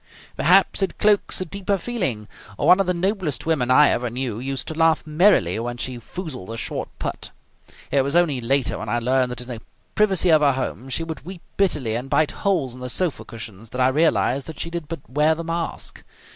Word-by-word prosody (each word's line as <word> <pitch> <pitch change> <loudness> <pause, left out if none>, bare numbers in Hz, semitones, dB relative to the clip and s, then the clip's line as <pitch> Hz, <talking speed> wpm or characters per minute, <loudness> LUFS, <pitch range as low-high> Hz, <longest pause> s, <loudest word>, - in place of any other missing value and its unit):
"Perhaps 190 +5 +4
it 190 -3 -1
cloaks 205 -2 +2
a - - -2
deeper 200 +3 -2
feeling. 175 - -3 0.3
One 185 - +5
of 195 - +1
the 180 - +2
noblest 185 -4 -1
women 150 -7 +1
I 145 +3 +6
ever 120 0 0
knew 120 -2 -3
used 130 0 -4
to - - -3
laugh 160 0 +2
merrily 155 - +3
when 120 +1 -4
she 125 0 -3
foozled 130 - -7
a 115 - -5
short - - -3
putt. - - -4 0.6
It 140 - +4
was 140 +3 -1
only 155 -7 +3
later, 125 -4 +1
when - - -5
I 120 - +1
learned 125 +1 +1
that 125 -1 -5
in 125 - -9
the 120 -3 -7 0.3
privacy 195 -4 +3
of 155 -1 +5
her 140 -2 +4
home 130 0 -4
she 165 - -1
would 160 -5 -7
weep 180 +1 -9
bitterly 150 - +1
and 125 +4 -3
bite 155 +1 +2
holes 170 -11 -1
in 125 - -11
the 125 0 -5
sofa 175 +4 0
cushions, 110 -1 -9
that 125 - -6
I 130 0 +4
realized 140 -2 +1
that 160 -2 -8
she 170 - -4
did 170 -3 -5
but 160 -3 -7
wear 150 +4 +2
the 165 - -5
mask. 165 0 -4
145 Hz, 215 wpm, -22 LUFS, 125-170 Hz, 0.6 s, I